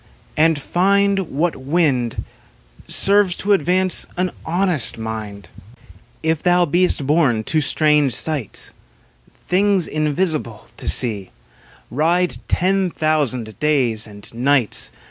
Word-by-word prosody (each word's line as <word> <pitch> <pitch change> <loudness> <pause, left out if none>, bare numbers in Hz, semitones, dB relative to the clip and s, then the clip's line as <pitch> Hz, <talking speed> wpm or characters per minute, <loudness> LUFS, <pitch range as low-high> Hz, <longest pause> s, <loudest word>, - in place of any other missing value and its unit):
And 160 -1 +2
find 195 +3 +1
What 160 +5 -1
wind 135 -4 -1 0.6
Serves 200 -2 +3
to 205 +1 0
advance 185 +1 +2
an 180 0 -1
honest 175 - +1
mind. 105 -5 -7 0.7
If 160 -1 0
thou 180 0 +3
beest 175 -2 +1
bom 135 -7 +1
to 155 +7 0
strange 150 -4 +2
sights. 145 -7 -2 0.7
Things 195 -1 +2
invisible 155 - -2
to - - -7
see, 105 -7 +2 0.6
Ride 170 +7 0
ten 190 +1 +1
thousand 140 -9 -2
days 125 -8 0
and 100 +1 -9
nights. 125 - +1
155 Hz, 105 wpm, -19 LUFS, 125-180 Hz, 0.7 s, Serves